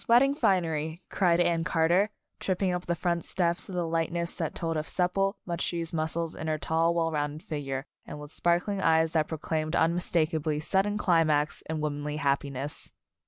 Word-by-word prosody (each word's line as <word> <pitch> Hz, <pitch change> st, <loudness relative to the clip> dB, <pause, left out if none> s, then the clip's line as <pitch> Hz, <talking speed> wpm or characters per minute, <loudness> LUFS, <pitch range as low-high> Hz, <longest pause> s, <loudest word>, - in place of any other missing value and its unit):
Wed 235 Hz, +1 st, +7 dB
ding 275 Hz, +1 st, +3 dB
finery 165 Hz, -, 0 dB
1" -, -, -11 dB
cried 175 Hz, -3 st, +4 dB
Anne 170 Hz, -1 st, +2 dB
Carter, 170 Hz, +5 st, +3 dB, 0.3 s
tripping 190 Hz, 0 st, 0 dB
up 180 Hz, 0 st, -4 dB
the 170 Hz, -, +1 dB
front 170 Hz, 0 st, -1 dB
steps 175 Hz, -1 st, 0 dB
with 185 Hz, -, -5 dB
a 175 Hz, -, +1 dB
lightness 165 Hz, +1 st, -1 dB
that 160 Hz, -, -3 dB
told 165 Hz, -1 st, -2 dB
of 155 Hz, 0 st, -2 dB
supple, 195 Hz, +3 st, +1 dB
much 170 Hz, -1 st, -2 dB
used 165 Hz, -1 st, -2 dB
muscles 160 Hz, +1 st, -1 dB
in 160 Hz, -, -6 dB
her 155 Hz, 0 st, 0 dB
tall, 165 Hz, +2 st, +1 dB
well 165 Hz, -1 st, +1 dB
rounded 150 Hz, 0 st, -2 dB
figure, 135 Hz, -3 st, -4 dB, 0.2 s
and 150 Hz, -, -8 dB
with 150 Hz, 0 st, -9 dB
sparkling 175 Hz, +5 st, +1 dB
eyes 160 Hz, -1 st, +3 dB
that 155 Hz, -2 st, +2 dB
proclaimed 155 Hz, 0 st, -2 dB
unmistakably 160 Hz, -2 st, +1 dB
sudden 195 Hz, +6 st, +1 dB
climax 155 Hz, -6 st, +2 dB
in 160 Hz, -1 st, -2 dB
womanly 150 Hz, 0 st, -2 dB
happiness. 140 Hz, -1 st, -1 dB
165 Hz, 180 wpm, -28 LUFS, 155-175 Hz, 0.3 s, Wed